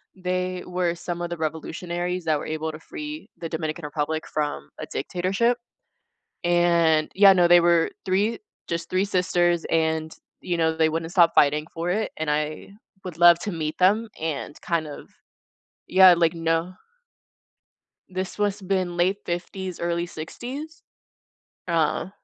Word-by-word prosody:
they 185 0 -2
were 180 -1 0
some 175 0 -5
of 175 - -3
the 175 - -3
revolutionaries 170 +3 -3
that 155 -2 +2
were - - -6
able 160 0 -3
to 155 - -10
free 300 - -8
the 165 - -4
Dominican 160 0 -4
Republic 155 +2 -3
from 145 - -3
a - - -4
dictatorship, 195 +7 0 0.9
and, 170 -3 +3
yeah, 195 0 +8
no, 175 -2 +4
they 175 0 +8
were 170 -1 +3
3, 200 +4 +1 0.3
just 170 0 -3
3 185 +2 +1
sisters, 175 -3 +1
and, 160 -1 0 0.3
you 175 - -2
know, 160 -1 +1
they 160 -1 +4
wouldn't 165 +1 -3
stop 170 -2 +5
fighting 150 +1 +4
for 165 +1 -3
it, 215 +4 -1
and 160 -1 -2
I 150 +1 -2 0.3
would 180 -4 -7
love 175 0 +7
to 205 - -4
meet 155 -3 -3
them 205 +5 +3
and 155 -2 -4
kind 165 -2 -1
of 145 - -10 0.8
Yeah, 185 -1 +7
like, 165 -1 +3
kno 165 +2 -1 1.4
This 185 0 -4
was 205 0 0
been 185 -2 -1
late 185 +3 +2
'50s, 180 +1 -4
early 170 0 -1
'60s. 255 - -8 0.9
Oh. 165 +2 0
175 Hz, 150 wpm, -24 LUFS, 160-185 Hz, 1.4 s, yeah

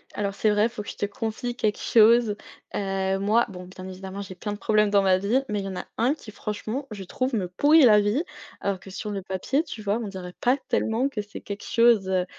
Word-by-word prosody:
Alors 200 -1 -2
c'est 215 - +2
vrai, 210 +2 +3
faut 215 -3 -7
que - - -8
je - - -7
te - - 0
confie 225 +4 -4
quelque 215 -3 0
chose. 230 -1 +5 0.4
Heu, 195 -1 -1
moi 215 +4 +3
bon, 180 -2 -9
bien 185 +1 -10
évidemment, 190 +1 -7
j'ai 195 -2 -8
plein 210 +3 -5
de - - -6
problèmes 210 0 +2
dans 200 -1 +4
ma 190 -1 +4
vie, 210 +8 +1
mais 210 -1 -1
il 195 - -4
y - - -3
en 190 - -5
a - - -5
1 245 +5 +3
qui 240 -8 -11
franchement, 215 +6 -4
je 200 -2 -6
trouve, 255 +8 -2
me 190 -5 -1
pourrit 290 - +5
la 215 -4 +7
vie, 205 +9 +1 0.4
alors 200 -2 -1
que 190 - -13
sur 210 +2 -5
le 195 - -3
papier, 190 - -1
tu 225 - -8
vois, 205 +1 0
on - - -4
dirait 185 -2 -7
pas 250 +3 +3
tellement 235 +5 +1
que 230 -7 -3
c'est 205 0 -10
quelque 200 0 -7
chose, 230 -5 +4
heu 185 -1 +1
205 Hz, 250 wpm, -25 LUFS, 195-230 Hz, 0.4 s, la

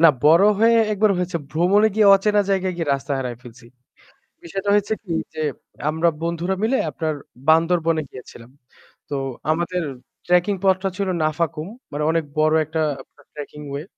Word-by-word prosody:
না, 165 - +8 0.2
বড় 165 +6 +6
হয়ে 230 +1 +5 0.2
একবার 210 +1 +2
হয়েছে 180 -1 -2
ভ্রমণে 195 +7 +3
গিয়ে 215 -1 +4
অচেনা 205 +1 +2
জায়গায় 190 -1 0
গিয়ে 165 -4 -3
রাস্তা 140 +1 -4
হারায় 125 -3 -4
ফেলছি। 120 0 -14 0.8
বিষয়টা 195 +4 -4
হয়েছে 205 +1 +2
কি 185 - -8 0.2
যে 155 - -5 0.5
আমরা 160 +2 +2
বন্ধুরা 170 +3 -2
মিলে 250 +4 +2
আপনার 155 +2 -2 0.3
বান্দরবনে 165 0 +3
গিয়েছিলাম। 120 -1 -13 0.6
তো 145 - -3 0.4
আমাদের 175 +3 -1 0.4
ট্রেকিং 180 +3 +2
পথটা 190 0 +2
ছিল 200 -1 -1
নাফাকুম। 155 0 -1 0.2
মানে 150 +1 -3
অনেক 165 0 0 0.2
বড় 155 0 +3
একটা 160 +1 -2 0.5
ট্র্যাকিং 150 0 -9
ওয়ে। 140 +2 -4
170 Hz, 150 wpm, -21 LUFS, 155-195 Hz, 0.8 s, না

